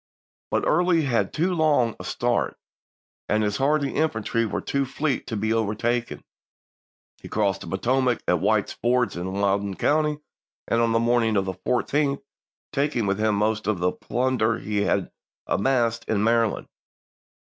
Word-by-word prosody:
But -, -, 0 dB
Early 170 Hz, 0 st, +3 dB
had 120 Hz, -5 st, 0 dB
too 175 Hz, +4 st, 0 dB
long 150 Hz, -9 st, +2 dB
a -, -, -7 dB
start, -, -, -1 dB, 0.7 s
and 110 Hz, 0 st, +2 dB
his 105 Hz, -1 st, 0 dB
hardy 140 Hz, +1 st, +1 dB
infantry 115 Hz, -6 st, 0 dB
were -, -, -2 dB
too 140 Hz, 0 st, -1 dB
fleet 135 Hz, 0 st, -2 dB
to 110 Hz, -, -3 dB
be 110 Hz, +2 st, 0 dB
overtaken. 115 Hz, +2 st, -1 dB, 1.0 s
He -, -, -10 dB
crossed 100 Hz, -2 st, 0 dB
the -, -, -8 dB
Potomac 125 Hz, +5 st, 0 dB
at -, -, +3 dB
White's -, -, +1 dB
Ford, 125 Hz, +1 st, +1 dB
in 90 Hz, +2 st, -4 dB
Loudon 100 Hz, 0 st, 0 dB
county, 150 Hz, +4 st, +1 dB, 0.5 s
on 115 Hz, 0 st, +3 dB
the 115 Hz, -, +3 dB
morning 115 Hz, -2 st, +2 dB
of 95 Hz, -, +1 dB
the 95 Hz, -, -3 dB
14th, 140 Hz, -, 0 dB, 0.5 s
taking 140 Hz, -5 st, 0 dB
with 100 Hz, +1 st, 0 dB
him 110 Hz, -1 st, +2 dB
most 105 Hz, 0 st, 0 dB
of 105 Hz, -3 st, +1 dB
the 90 Hz, +1 st, +1 dB
plunder 120 Hz, -2 st, 0 dB
he 105 Hz, -2 st, -4 dB
had -, -, 0 dB, 0.3 s
amassed 115 Hz, 0 st, +1 dB
in 105 Hz, -2 st, +1 dB
Maryland. 115 Hz, -1 st, +1 dB
115 Hz, 155 wpm, -24 LUFS, 105-135 Hz, 1.0 s, Early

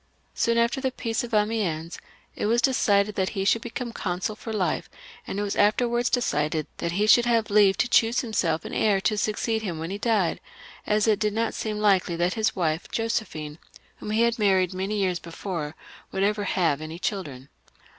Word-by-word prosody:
Soon 235 Hz, -1 st, +1 dB
after 235 Hz, +3 st, +1 dB
the 265 Hz, -, +1 dB
peace 230 Hz, -2 st, -2 dB
of 240 Hz, -, -7 dB
Amiens 210 Hz, -7 st, -1 dB, 0.4 s
it -, -, -1 dB
was 235 Hz, +2 st, +3 dB
decided 210 Hz, -5 st, +2 dB
that 190 Hz, -1 st, 0 dB
he 195 Hz, -, 0 dB
should 225 Hz, +3 st, +3 dB
become 240 Hz, 0 st, -5 dB
consul 185 Hz, +2 st, -3 dB
for 225 Hz, -, -7 dB
life, 200 Hz, -4 st, -1 dB, 0.4 s
and -, -, -4 dB
it 205 Hz, -, 0 dB
was 200 Hz, -, -2 dB
afterwards 240 Hz, +3 st, +2 dB
decided 155 Hz, -, 0 dB
that 170 Hz, 0 st, -3 dB
he 205 Hz, +4 st, +1 dB
should 235 Hz, +3 st, +6 dB
have 230 Hz, -3 st, +1 dB
leave 200 Hz, -2 st, +5 dB
to -, -, +2 dB
choose 235 Hz, 0 st, +3 dB
himself 180 Hz, -9 st, -1 dB
an -, -, -6 dB
heir 205 Hz, -3 st, +2 dB
to 215 Hz, -, +1 dB
succeed 220 Hz, +1 st, -1 dB
him 180 Hz, -6 st, -4 dB
when 165 Hz, +3 st, -5 dB
he 200 Hz, -, -4 dB
died, 210 Hz, -6 st, +1 dB, 0.5 s
as 210 Hz, 0 st, +2 dB
it 215 Hz, -2 st, +3 dB
did 210 Hz, -1 st, 0 dB
not 225 Hz, +1 st, -1 dB
seem 215 Hz, -1 st, -3 dB
likely 195 Hz, -5 st, +2 dB
that 175 Hz, +2 st, 0 dB
his 220 Hz, -1 st, 0 dB
wife 165 Hz, -2 st, -1 dB
Josephine, 170 Hz, -10 st, -3 dB, 0.4 s
whom -, -, -8 dB
he 220 Hz, +2 st, +2 dB
had 235 Hz, 0 st, +1 dB
married 190 Hz, -3 st, +3 dB
many 195 Hz, +3 st, -2 dB
years 185 Hz, -3 st, 0 dB
before, 165 Hz, -2 st, -5 dB, 0.4 s
would 190 Hz, -, -1 dB
ever 205 Hz, 0 st, +1 dB
have 165 Hz, -7 st, +1 dB
any 155 Hz, +1 st, -6 dB
children. 145 Hz, -9 st, -4 dB
205 Hz, 195 wpm, -25 LUFS, 180-225 Hz, 0.5 s, should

